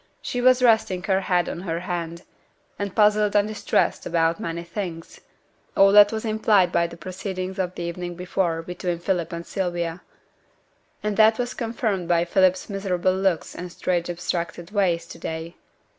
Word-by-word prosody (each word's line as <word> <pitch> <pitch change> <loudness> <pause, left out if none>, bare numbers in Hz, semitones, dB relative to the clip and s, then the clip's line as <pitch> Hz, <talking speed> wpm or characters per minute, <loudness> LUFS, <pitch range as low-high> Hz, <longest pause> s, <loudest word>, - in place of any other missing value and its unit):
She 245 - -3
was 255 0 +5
resting 220 -6 +3
her 190 -1 +1
head 180 -2 +1
on - - -4
her 170 -2 -3
hand, 170 -2 -4 0.6
and 200 -2 -4
puzzled 210 -1 +3
and 205 0 +4
distressed 215 -1 0
about 165 0 +1
many 170 +1 -4
things 170 -2 -6 0.6
all 195 0 +7
that 205 0 +8
was 220 0 -3
implied 215 -4 +3
by 170 - +2
the 170 - -11
proceedings 185 +2 -5
of 180 -1 -2
the 175 - -5
evening 175 +1 -5
before 175 -2 -1
between 180 0 -3
Philip 175 -1 -1
and 170 0 -6
Sylvia; 175 -2 -3 1.0
and 210 -1 -1
that 220 0 +6
was 245 0 -2
confirmed 225 -6 -2
by 170 0 +2
Philip's 185 +1 +2
miserable 190 -2 0
looks 190 -3 0
and 180 0 -7
strange 175 -1 -1
abstracted 170 0 -4
ways 180 -5 +1
to 165 - -11
day. 160 +1 -5
180 Hz, 165 wpm, -24 LUFS, 170-205 Hz, 1.0 s, that